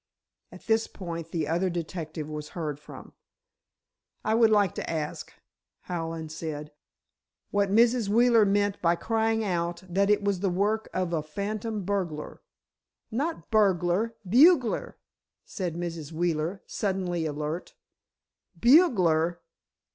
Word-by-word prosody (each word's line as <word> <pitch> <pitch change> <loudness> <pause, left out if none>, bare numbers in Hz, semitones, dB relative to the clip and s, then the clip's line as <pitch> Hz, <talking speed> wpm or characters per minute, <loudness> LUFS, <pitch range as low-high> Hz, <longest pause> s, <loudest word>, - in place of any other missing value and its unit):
At - - -13
this 225 0 +2
point 170 -3 -7
the 160 -3 -2
other 175 +4 +1
detective 165 -3 -5
was 150 -1 -6
heard 150 -4 -3
from. - - -12 1.1
"I 215 - +2
would 225 0 +5
like 205 -4 +3
to - - -5
ask," 155 -2 -4 0.5
Hallen 165 -2 -4
said, 155 -2 -6 0.8
"what 200 -1 +2
Mrs. 230 +1 +3
Wheeler 230 +1 +5
meant 205 0 +1
by 170 0 +3
crying 225 +3 0
out 175 -2 -2
that 195 +3 +1
it 210 0 +3
was 200 -2 0
the 195 +1 0
work 205 +5 0
of 185 -2 -2
a 160 - +1
'phantom 205 +6 -4
burglar'?" 175 -6 -3 0.7
"Not 290 +8 -3
burglar—bugler," 220 - +3 0.5
said 180 -5 -4
Mrs. 170 -3 -5
Wheeler, 170 +2 -1
suddenly 185 -5 -2
alert. 150 +3 -4 0.8
"Bugler!" 180 - +4
185 Hz, 120 wpm, -27 LUFS, 165-215 Hz, 1.1 s, would